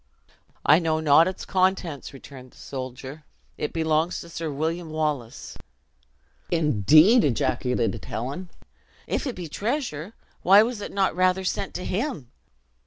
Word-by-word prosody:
"I 150 Hz, +3 st, +6 dB
know 160 Hz, -2 st, 0 dB
not 160 Hz, +2 st, +5 dB
its 185 Hz, -, -5 dB
contents," 185 Hz, -6 st, 0 dB
returned 130 Hz, -2 st, -13 dB
the -, -, -20 dB
soldier; 130 Hz, +2 st, -7 dB, 0.3 s
"it 150 Hz, -, -3 dB
belongs 160 Hz, +1 st, 0 dB
to 170 Hz, -, -11 dB
Sir 165 Hz, -1 st, -4 dB
William 160 Hz, +4 st, -3 dB
Wallace." 150 Hz, -7 st, -3 dB, 0.9 s
"Indeed!" 155 Hz, -, +5 dB
ejaculated 120 Hz, -3 st, 0 dB
Helen. 140 Hz, +10 st, -5 dB, 0.6 s
"If -, -, -2 dB
it 255 Hz, -, -4 dB
be 175 Hz, -2 st, -6 dB
treasure, 210 Hz, -, -3 dB, 0.3 s
why 200 Hz, +3 st, +7 dB
was 230 Hz, -2 st, -3 dB
it -, -, -6 dB
not 195 Hz, -4 st, +1 dB
rather 185 Hz, +1 st, +2 dB
sent 195 Hz, +1 st, -3 dB
to 180 Hz, -, -4 dB
him!" 190 Hz, -, -3 dB
160 Hz, 135 wpm, -25 LUFS, 140-185 Hz, 0.9 s, why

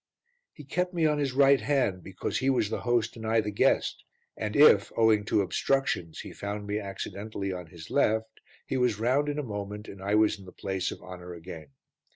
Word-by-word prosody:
He 150 Hz, -, -12 dB
kept 180 Hz, +6 st, -2 dB
me 165 Hz, -2 st, +2 dB
on 150 Hz, -1 st, +2 dB
his 140 Hz, -3 st, -1 dB
right 135 Hz, -1 st, +5 dB
hand 120 Hz, -7 st, +1 dB
because 95 Hz, +1 st, -3 dB
he 135 Hz, -, +1 dB
was 115 Hz, -5 st, +1 dB
the -, -, -1 dB
host 120 Hz, -1 st, 0 dB
and 115 Hz, -, -9 dB
I 110 Hz, +1 st, +2 dB
the 105 Hz, -1 st, -1 dB
guest, 100 Hz, -, +1 dB, 0.3 s
and 105 Hz, 0 st, -4 dB
if, 125 Hz, -9 st, +6 dB
owing 110 Hz, -2 st, +4 dB
to 105 Hz, -, +2 dB
obstructions, 95 Hz, -5 st, -1 dB
he -, -, -9 dB
found 105 Hz, +1 st, -5 dB
me 105 Hz, +1 st, -2 dB
accidentally 100 Hz, 0 st, -5 dB
on 90 Hz, -2 st, -7 dB
his 80 Hz, 0 st, -12 dB
left 110 Hz, 0 st, +1 dB, 0.3 s
he 135 Hz, -, -2 dB
was 125 Hz, -4 st, +2 dB
round 130 Hz, +6 st, +1 dB
in 145 Hz, -, -2 dB
a 150 Hz, -, -1 dB
moment 105 Hz, -2 st, -6 dB
and 95 Hz, -, -10 dB
I 100 Hz, +2 st, 0 dB
was 105 Hz, -1 st, +3 dB
in 95 Hz, -, -13 dB
the 90 Hz, -, -11 dB
place 95 Hz, -2 st, -3 dB
of -, -, -8 dB
honour 90 Hz, -1 st, -9 dB
again. 80 Hz, -2 st, -9 dB
105 Hz, 210 wpm, -28 LUFS, 95-130 Hz, 0.3 s, if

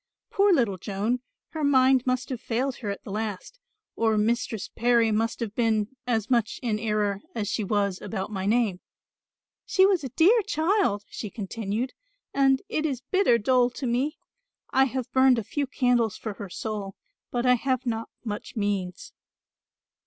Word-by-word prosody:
"Poor 400 Hz, 0 st, +4 dB
little 230 Hz, -, +2 dB
Joan, 210 Hz, +7 st, -1 dB, 0.3 s
her 315 Hz, -1 st, -4 dB
mind 260 Hz, -2 st, +4 dB
must 255 Hz, 0 st, 0 dB
have 250 Hz, -3 st, -4 dB
failed 250 Hz, +3 st, -1 dB
her 215 Hz, -, -5 dB
at 200 Hz, -, -5 dB
the -, -, -8 dB
last, 215 Hz, -, -4 dB, 0.4 s
or 220 Hz, -1 st, +2 dB
Mistress 225 Hz, -1 st, 0 dB
Parry 235 Hz, -1 st, +2 dB
must 225 Hz, +2 st, 0 dB
have 220 Hz, -3 st, -3 dB
been 225 Hz, 0 st, 0 dB
as 220 Hz, -3 st, 0 dB
much 235 Hz, -4 st, +1 dB
in 220 Hz, -3 st, 0 dB
error 210 Hz, -2 st, 0 dB
as 215 Hz, -3 st, -2 dB
she 210 Hz, +2 st, -1 dB
was 200 Hz, -2 st, 0 dB
about 200 Hz, -1 st, -4 dB
my 195 Hz, -1 st, -3 dB
name. 215 Hz, -4 st, +2 dB, 0.8 s
She 380 Hz, -, +4 dB
was 380 Hz, -5 st, +2 dB
a 265 Hz, -, -4 dB
dear 380 Hz, -, +5 dB
child," 325 Hz, -, +1 dB
she 215 Hz, -, -6 dB
continued, 220 Hz, +4 st, -3 dB, 0.4 s
"and 270 Hz, -1 st, +3 dB
it 310 Hz, -, -1 dB
is 270 Hz, -5 st, -2 dB
bitter 375 Hz, -11 st, +4 dB
dole 245 Hz, +2 st, +3 dB
to 255 Hz, +2 st, -6 dB
me. 255 Hz, +6 st, 0 dB, 0.5 s
I 265 Hz, +1 st, +5 dB
have 260 Hz, -1 st, -4 dB
burned 260 Hz, -1 st, +5 dB
a 230 Hz, -, -1 dB
few 285 Hz, +7 st, -2 dB
candles 245 Hz, -4 st, +1 dB
for 215 Hz, -, -5 dB
her 200 Hz, -1 st, -8 dB
soul, 205 Hz, 0 st, -5 dB, 0.3 s
but 245 Hz, 0 st, -1 dB
I 250 Hz, -, +6 dB
have 255 Hz, +1 st, 0 dB
not 230 Hz, -1 st, -2 dB, 0.2 s
much 210 Hz, -2 st, -5 dB
means." 200 Hz, -4 st, -2 dB
235 Hz, 170 wpm, -26 LUFS, 210-260 Hz, 0.8 s, I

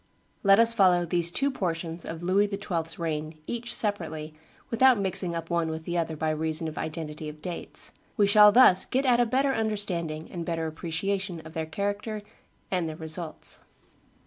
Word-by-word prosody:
Let 195 Hz, -1 st, +6 dB
us 230 Hz, 0 st, +5 dB
follow 180 Hz, -5 st, +4 dB
these 170 Hz, 0 st, +2 dB
two 275 Hz, +10 st, +1 dB
portions 170 Hz, -6 st, -3 dB
of 165 Hz, +1 st, -6 dB
Louis 195 Hz, +3 st, +3 dB
XII.'s 180 Hz, -5 st, -3 dB
reign, 155 Hz, -1 st, -3 dB
each 235 Hz, +3 st, -5 dB
separately, 160 Hz, -9 st, -1 dB, 0.4 s
without 250 Hz, 0 st, +5 dB
mixing 190 Hz, -3 st, 0 dB
up 165 Hz, 0 st, -5 dB
one 170 Hz, -1 st, +1 dB
with 160 Hz, 0 st, -5 dB
the 175 Hz, +2 st, -4 dB
other 165 Hz, -2 st, -1 dB
by 155 Hz, +1 st, 0 dB
reason 160 Hz, +1 st, -2 dB
of 155 Hz, -, -6 dB
identity 155 Hz, -1 st, -5 dB
of 150 Hz, 0 st, -11 dB
dates. 175 Hz, +2 st, -3 dB, 0.3 s
We 205 Hz, -, +5 dB
shall 210 Hz, +1 st, +7 dB
thus 220 Hz, -6 st, +7 dB
get 265 Hz, +2 st, 0 dB
at 245 Hz, -2 st, +4 dB
a 240 Hz, -, +3 dB
better 270 Hz, +3 st, +2 dB
understanding 185 Hz, -9 st, -2 dB
and 170 Hz, -2 st, -4 dB
better 165 Hz, -1 st, -2 dB
appreciation 175 Hz, +3 st, -3 dB
of 160 Hz, 0 st, -12 dB
their 160 Hz, -1 st, -3 dB
character 205 Hz, +4 st, -3 dB, 0.5 s
and 180 Hz, -4 st, 0 dB
their 155 Hz, -, -6 dB
results. 160 Hz, 0 st, -3 dB
175 Hz, 175 wpm, -27 LUFS, 160-205 Hz, 0.5 s, shall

